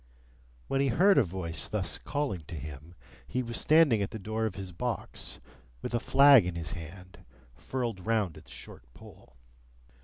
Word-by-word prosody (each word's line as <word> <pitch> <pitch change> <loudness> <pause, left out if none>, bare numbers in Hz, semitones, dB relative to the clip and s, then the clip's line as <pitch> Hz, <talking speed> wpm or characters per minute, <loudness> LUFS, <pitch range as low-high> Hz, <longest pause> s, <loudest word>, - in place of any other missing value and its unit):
When 135 - +1
he 140 - +2
heard 190 - +5
a - - +5
voice 85 -4 -5
thus - - -2
calling 145 - -2
to 85 - -7
him, 75 +3 -9 0.3
he 130 - -1
was 115 -1 -5
standing 155 -9 +5
at 100 - -1
the - - -6
door 110 +2 -2
of 105 - -6
his 95 -2 -6
box, 85 - -4 0.4
with - - -4
a 120 - +2
flag 140 -2 +7
in 90 - -3
his 85 0 -4
hand, 90 +3 -9 0.3
furled 115 - -4
round 105 -6 0
its 80 - -14
short - - -10
pole. - - -16
100 Hz, 175 wpm, -30 LUFS, 85-125 Hz, 0.4 s, flag